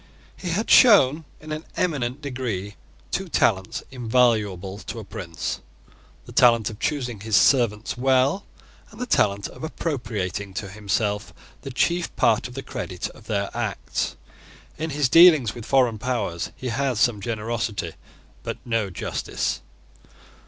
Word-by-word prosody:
He 180 Hz, -, -6 dB
had 200 Hz, +7 st, -1 dB
shown, 160 Hz, -, +7 dB
in 155 Hz, 0 st, -10 dB
an 155 Hz, +1 st, -4 dB
eminent 140 Hz, -6 st, -1 dB
degree, 115 Hz, -8 st, -4 dB, 0.4 s
two 190 Hz, -, -2 dB
talents 95 Hz, -10 st, +1 dB
invaluable 110 Hz, -6 st, +1 dB
to 115 Hz, -, -7 dB
a 110 Hz, -, -6 dB
prince, 85 Hz, -5 st, -5 dB, 0.7 s
the -, -, -11 dB
talent 115 Hz, -3 st, +4 dB
of 105 Hz, -, -11 dB
choosing 125 Hz, -7 st, -2 dB
his 110 Hz, +1 st, -1 dB
servants 110 Hz, 0 st, +3 dB
well, 135 Hz, +8 st, +3 dB, 0.5 s
and 220 Hz, -, -15 dB
the 250 Hz, -, -2 dB
talent 100 Hz, -, +2 dB
of -, -, -12 dB
appropriating 110 Hz, -, -3 dB
to 100 Hz, 0 st, -4 dB
himself 105 Hz, +1 st, -2 dB, 0.3 s
the -, -, -7 dB
chief 170 Hz, +7 st, +1 dB
part 115 Hz, -3 st, +3 dB
of 125 Hz, -, -12 dB
the 135 Hz, -, -5 dB
credit 90 Hz, -2 st, -5 dB
of -, -, -16 dB
their 100 Hz, -2 st, -1 dB
acts. -, -, -2 dB, 0.6 s
In 160 Hz, +2 st, -3 dB
his 145 Hz, -2 st, +1 dB
dealings 155 Hz, -6 st, +7 dB
with 120 Hz, -1 st, -9 dB
foreign 125 Hz, -5 st, +3 dB
powers 105 Hz, -9 st, -2 dB
he 130 Hz, -, -5 dB
had 130 Hz, 0 st, 0 dB
some 110 Hz, -2 st, +2 dB
generosity, 110 Hz, -4 st, -2 dB, 0.5 s
but -, -, -5 dB
no 115 Hz, -4 st, 0 dB
justice. 90 Hz, -, -3 dB
120 Hz, 145 wpm, -24 LUFS, 105-135 Hz, 0.7 s, shown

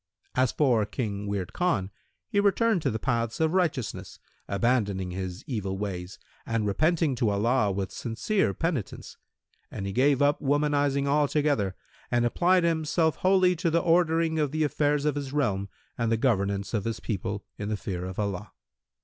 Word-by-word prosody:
As 130 Hz, -1 st, +2 dB
for 125 Hz, -7 st, +2 dB
King 105 Hz, -5 st, -3 dB
Wird 100 Hz, -3 st, -3 dB
Khan, 105 Hz, -, 0 dB, 0.4 s
he 205 Hz, -4 st, +1 dB
returned 205 Hz, 0 st, +3 dB
to -, -, +1 dB
the 110 Hz, -, -2 dB
paths 115 Hz, -1 st, -1 dB
of 160 Hz, +1 st, +2 dB
righteousness, 160 Hz, -, -1 dB, 0.3 s
abandoning 100 Hz, -4 st, 0 dB
his 90 Hz, 0 st, -5 dB
evil 100 Hz, -7 st, -3 dB
ways 95 Hz, -2 st, -5 dB, 0.3 s
and 115 Hz, -2 st, -1 dB
repenting 155 Hz, -, +2 dB
to 115 Hz, -3 st, +2 dB
Allah 105 Hz, +1 st, +2 dB
with 95 Hz, -1 st, -3 dB
sincere 115 Hz, -, -1 dB
penitence; 160 Hz, -, -3 dB, 0.5 s
and 100 Hz, -, -6 dB
he 100 Hz, -, -2 dB
gave 135 Hz, +4 st, +3 dB
up 145 Hz, 0 st, +3 dB
womanising 145 Hz, -1 st, +1 dB
altogether 145 Hz, -7 st, +1 dB, 0.3 s
and 120 Hz, -1 st, +2 dB
applied 175 Hz, +9 st, +3 dB
himself 160 Hz, -1 st, +1 dB
wholly 185 Hz, -1 st, +3 dB
to 170 Hz, +1 st, 0 dB
the 165 Hz, -, +2 dB
ordering 165 Hz, -1 st, +2 dB
of 150 Hz, -3 st, +1 dB
the 155 Hz, +1 st, 0 dB
affairs 150 Hz, 0 st, +1 dB
of 150 Hz, -, +2 dB
his 140 Hz, -1 st, -5 dB
realm 100 Hz, -9 st, 0 dB, 0.3 s
and 115 Hz, -1 st, +1 dB
the 115 Hz, -, +3 dB
governance 100 Hz, -4 st, 0 dB
of 105 Hz, -3 st, -1 dB
his 115 Hz, -1 st, -2 dB
people 100 Hz, -1 st, -4 dB
in 105 Hz, 0 st, -3 dB
the 105 Hz, -, -1 dB
fear 90 Hz, -3 st, -4 dB
of 95 Hz, 0 st, -6 dB
Allah. 100 Hz, -1 st, -3 dB
125 Hz, 165 wpm, -27 LUFS, 100-155 Hz, 0.5 s, returned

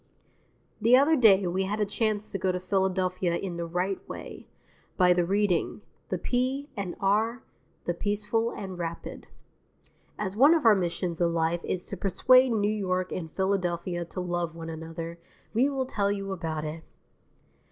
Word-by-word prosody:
II -, -, -38 dB, 0.2 s
The 235 Hz, +3 st, +6 dB
other 290 Hz, +4 st, +5 dB
day 205 Hz, -8 st, +6 dB
we 185 Hz, +2 st, 0 dB
had 210 Hz, +3 st, -2 dB
a 210 Hz, -, +2 dB
chance 215 Hz, 0 st, -1 dB
to 195 Hz, -, -3 dB
go 185 Hz, 0 st, +1 dB
to 180 Hz, -, -2 dB
Philadelphia 185 Hz, -2 st, 0 dB
in 180 Hz, -3 st, -5 dB
the 170 Hz, 0 st, -3 dB
right 180 Hz, +3 st, -1 dB
way -, -, -8 dB, 0.5 s
by 180 Hz, -1 st, +6 dB
the 175 Hz, 0 st, +2 dB
Reading, 200 Hz, -1 st, +1 dB, 0.3 s
the 185 Hz, -, -1 dB
P. 260 Hz, -, -1 dB
and 195 Hz, -4 st, -4 dB
R., 220 Hz, +5 st, +1 dB, 0.4 s
the 175 Hz, -, 0 dB
Peaceful 210 Hz, +5 st, -1 dB
and 190 Hz, -5 st, -7 dB
Rapid. 170 Hz, -1 st, -6 dB, 0.9 s
As 195 Hz, -2 st, -3 dB
one 285 Hz, +8 st, +7 dB
of 315 Hz, -, 0 dB
our 225 Hz, -, +8 dB
missions 175 Hz, -2 st, -2 dB
in 170 Hz, -1 st, +3 dB
life 165 Hz, +1 st, 0 dB
is 180 Hz, -, -3 dB
to 195 Hz, -, -6 dB
persuade 255 Hz, +8 st, +4 dB
New 210 Hz, -3 st, +1 dB
York 185 Hz, -3 st, -1 dB
and 165 Hz, -3 st, -4 dB
Philadelphia 180 Hz, -2 st, -1 dB
to 170 Hz, -, -7 dB
love 175 Hz, -2 st, -2 dB
one 165 Hz, -1 st, -6 dB
another, 165 Hz, +1 st, -7 dB, 0.3 s
we 250 Hz, +6 st, +3 dB
will 270 Hz, -2 st, -1 dB
tell 200 Hz, -5 st, 0 dB
you 195 Hz, -1 st, -3 dB
about 160 Hz, -4 st, -3 dB
it. 160 Hz, +1 st, -6 dB
190 Hz, 175 wpm, -28 LUFS, 175-210 Hz, 0.9 s, our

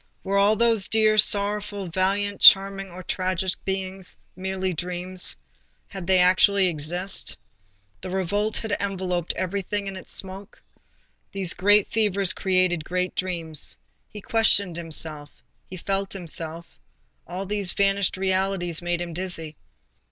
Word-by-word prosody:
Were 200 Hz, +1 st, +1 dB
all 205 Hz, +2 st, +4 dB
those 225 Hz, -4 st, +2 dB
dear, 215 Hz, 0 st, +3 dB
sorrowful, 205 Hz, -1 st, 0 dB
valiant, 195 Hz, +3 st, 0 dB
charming 195 Hz, 0 st, +7 dB
or 185 Hz, +1 st, -10 dB
tragic 185 Hz, +1 st, -1 dB
beings 190 Hz, -1 st, -4 dB, 0.2 s
merely 190 Hz, 0 st, -3 dB
dreams? 180 Hz, +2 st, -3 dB, 0.5 s
had 190 Hz, -3 st, -7 dB
they 190 Hz, -1 st, +4 dB
actually 185 Hz, +2 st, +4 dB
existed? 175 Hz, +5 st, -2 dB, 0.6 s
The -, -, -6 dB
revolt 200 Hz, +3 st, -1 dB
had 220 Hz, -, -4 dB
enveloped 185 Hz, -3 st, -2 dB
everything 200 Hz, +2 st, -3 dB
in 195 Hz, -1 st, -5 dB
its 185 Hz, -, -5 dB
smoke. 195 Hz, +2 st, -4 dB, 0.7 s
These 190 Hz, -3 st, -1 dB
great 205 Hz, +2 st, +4 dB
fevers 200 Hz, -4 st, +1 dB
create 185 Hz, -3 st, +1 dB
great 180 Hz, +2 st, -2 dB
dreams. 165 Hz, -, -1 dB, 0.3 s
He 210 Hz, -, -10 dB
questioned 200 Hz, -5 st, +4 dB
himself; 160 Hz, -3 st, -4 dB, 0.4 s
he 185 Hz, -, -8 dB
felt 195 Hz, +2 st, -2 dB
himself; 165 Hz, -2 st, -3 dB, 0.5 s
all 185 Hz, +3 st, -5 dB
these 200 Hz, -2 st, -2 dB
vanished 195 Hz, -1 st, +1 dB
realities 190 Hz, -3 st, -1 dB
made 175 Hz, 0 st, -2 dB
him 170 Hz, -1 st, -5 dB
dizzy. 165 Hz, -3 st, -3 dB
190 Hz, 130 wpm, -24 LUFS, 180-200 Hz, 0.7 s, charming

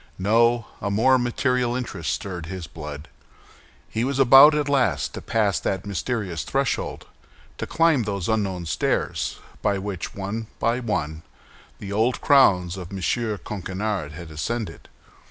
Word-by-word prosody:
No; 115 Hz, +4 st, +3 dB, 0.2 s
a 100 Hz, -, -1 dB
more 125 Hz, +6 st, +4 dB
material 125 Hz, 0 st, 0 dB
interest 85 Hz, -11 st, -3 dB
stirred 90 Hz, -2 st, -4 dB
his 95 Hz, -1 st, -6 dB
blood. 75 Hz, -2 st, -8 dB, 0.8 s
He 115 Hz, -, -2 dB
was 135 Hz, +1 st, -1 dB
about 135 Hz, +3 st, +8 dB
at 150 Hz, -1 st, 0 dB
last 140 Hz, -3 st, +1 dB
to -, -, -6 dB
pass 105 Hz, -4 st, +1 dB
that 95 Hz, 0 st, -2 dB
mysterious 100 Hz, -3 st, -2 dB
threshold, 135 Hz, -1 st, -2 dB, 0.5 s
to -, -, -3 dB
climb 165 Hz, -5 st, +3 dB
those 100 Hz, -4 st, -3 dB
unknown 95 Hz, -5 st, -1 dB
stairs 80 Hz, -, -1 dB, 0.2 s
by 100 Hz, -, +1 dB
which, 95 Hz, -2 st, -5 dB
one 100 Hz, +3 st, -4 dB
by 115 Hz, +2 st, +1 dB
one, 80 Hz, -10 st, -2 dB, 0.6 s
the 100 Hz, -1 st, -7 dB
old 115 Hz, +5 st, +1 dB
crowns 95 Hz, -, +4 dB
of 90 Hz, -1 st, -8 dB
M. 95 Hz, -, -5 dB, 0.5 s
Coquenard 95 Hz, -4 st, -3 dB
had 85 Hz, 0 st, -9 dB
ascended. 105 Hz, +4 st, -4 dB
105 Hz, 140 wpm, -24 LUFS, 90-120 Hz, 0.8 s, about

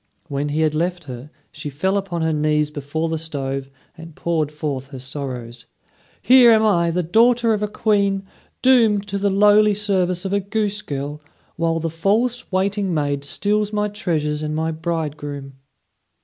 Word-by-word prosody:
When 145 Hz, +1 st, -2 dB
he 150 Hz, +2 st, 0 dB
had 155 Hz, -1 st, +2 dB
left 175 Hz, +3 st, -1 dB
her, 130 Hz, 0 st, -9 dB, 0.2 s
she 145 Hz, 0 st, -6 dB
fell 190 Hz, +8 st, -1 dB
upon 185 Hz, -4 st, -2 dB
her 160 Hz, 0 st, +1 dB
knees 150 Hz, 0 st, +1 dB
before 150 Hz, +3 st, -3 dB
the 160 Hz, -1 st, -2 dB
stove 135 Hz, -4 st, -4 dB, 0.3 s
and 165 Hz, -1 st, -12 dB
poured 160 Hz, -3 st, -1 dB
forth 145 Hz, -3 st, -4 dB
her 135 Hz, -1 st, -9 dB
sorrows: 125 Hz, -3 st, -7 dB, 0.6 s
"Here 250 Hz, -1 st, +7 dB
am 220 Hz, -1 st, +5 dB
I, 170 Hz, -5 st, +3 dB
the 175 Hz, +2 st, 0 dB
daughter 230 Hz, +6 st, +3 dB
of 210 Hz, -, -1 dB
a 210 Hz, -, 0 dB
Queen, 200 Hz, -2 st, +1 dB, 0.4 s
doomed 225 Hz, -6 st, +4 dB
to 200 Hz, 0 st, -2 dB
the 200 Hz, +1 st, +1 dB
lowly 205 Hz, +1 st, +5 dB
service 190 Hz, -3 st, 0 dB
of 190 Hz, -, -2 dB
a 200 Hz, -, +3 dB
goose 205 Hz, +1 st, -2 dB
girl, 145 Hz, -2 st, -5 dB, 0.3 s
while 165 Hz, 0 st, 0 dB
the 165 Hz, -, -2 dB
false 210 Hz, +10 st, 0 dB
waiting 195 Hz, +1 st, 0 dB
maid 145 Hz, -2 st, -1 dB
steals 210 Hz, +7 st, -1 dB
my 210 Hz, 0 st, 0 dB
treasures 155 Hz, -7 st, -2 dB
and 155 Hz, 0 st, -3 dB
my 160 Hz, +1 st, -1 dB
bridegroom." 150 Hz, -4 st, -4 dB
165 Hz, 170 wpm, -21 LUFS, 150-205 Hz, 0.6 s, Here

